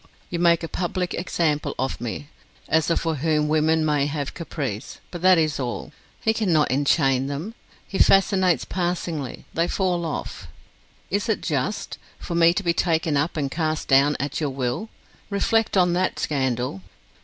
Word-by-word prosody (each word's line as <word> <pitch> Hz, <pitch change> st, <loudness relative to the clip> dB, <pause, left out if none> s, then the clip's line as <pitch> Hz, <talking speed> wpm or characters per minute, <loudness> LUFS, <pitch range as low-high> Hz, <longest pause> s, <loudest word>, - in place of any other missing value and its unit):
You 170 Hz, -, -2 dB
make 170 Hz, -1 st, +4 dB
a -, -, -2 dB
public 180 Hz, +1 st, -2 dB
example 160 Hz, -4 st, -1 dB
of 130 Hz, -1 st, -2 dB
me 120 Hz, +5 st, -5 dB, 0.4 s
as 160 Hz, +1 st, +2 dB
a 170 Hz, -, +2 dB
for 165 Hz, -2 st, -1 dB
whom 150 Hz, +1 st, +1 dB
women 155 Hz, +1 st, +2 dB
may 145 Hz, -2 st, +2 dB
have 145 Hz, -2 st, -3 dB
a -, -, -11 dB
caprice, 140 Hz, -, -5 dB
but 175 Hz, -, -6 dB
that 185 Hz, 0 st, +6 dB
is 155 Hz, -3 st, +1 dB
all; 125 Hz, -2 st, -4 dB, 0.3 s
he 220 Hz, -, +2 dB
cannot 175 Hz, -, +2 dB
enchain 135 Hz, -1 st, +2 dB
them; 150 Hz, +10 st, -4 dB, 0.3 s
he 195 Hz, -, -4 dB
fascinates 190 Hz, -3 st, +4 dB
passingly; 175 Hz, -6 st, -3 dB
they 165 Hz, +1 st, +1 dB
fall 180 Hz, -3 st, 0 dB
off. 145 Hz, -, -5 dB, 0.6 s
Is 205 Hz, +4 st, 0 dB
it 220 Hz, -, +1 dB
just, 155 Hz, +7 st, -2 dB, 0.2 s
for -, -, -6 dB
me 170 Hz, 0 st, +5 dB
to 200 Hz, +4 st, -2 dB
be 170 Hz, -2 st, +2 dB
taken 165 Hz, -2 st, +1 dB
up 145 Hz, +4 st, 0 dB
and 140 Hz, -3 st, -1 dB
cast 155 Hz, -1 st, -1 dB
down 140 Hz, +2 st, +4 dB
at 145 Hz, +4 st, -3 dB
your 150 Hz, -, 0 dB
will? 130 Hz, -, -3 dB, 0.4 s
Reflect 210 Hz, +1 st, +1 dB
on 180 Hz, -2 st, +4 dB
that 185 Hz, +1 st, 0 dB
scandal! 130 Hz, -7 st, -1 dB
160 Hz, 170 wpm, -24 LUFS, 140-175 Hz, 0.6 s, that